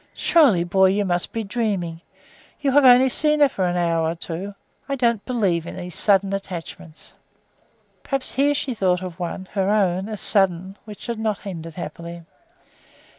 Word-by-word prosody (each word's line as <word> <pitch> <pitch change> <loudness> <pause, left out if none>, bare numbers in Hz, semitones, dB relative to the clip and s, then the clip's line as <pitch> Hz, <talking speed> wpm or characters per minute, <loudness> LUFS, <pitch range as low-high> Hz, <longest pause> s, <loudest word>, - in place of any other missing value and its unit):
"Surely, 265 - +4
boy, 190 +2 +3
you 200 +2 +1
must 175 -1 -1
be 225 - -3
dreaming! 195 -7 -2 0.6
You 280 -2 0
have 290 +1 +5
only 255 0 +7
seen 300 +3 +1
her 290 - +6
for 195 -8 -2
an 175 0 -1
hour 165 -2 +1
or 165 - -3
two. 180 +4 -6 0.3
I 275 - 0
don't 235 -5 +1
believe 190 -9 0
in - - -7
these 180 -1 -7
sudden 195 +1 +2
attachments." 175 -4 -7 0.9
Perhaps 275 -1 +1
she 280 +2 +2
here 275 -2 -2
thought 185 -4 0
of 180 -1 -7
one 180 +2 -5
(her 195 -1 0
own) 195 -1 +1
as 215 -2 -5
sudden, 190 -2 +1
which 210 -2 -10
had 235 -2 -4
not 215 -2 -2
ended 165 -4 -7
happily. 170 -1 -7
195 Hz, 175 wpm, -22 LUFS, 175-230 Hz, 0.9 s, only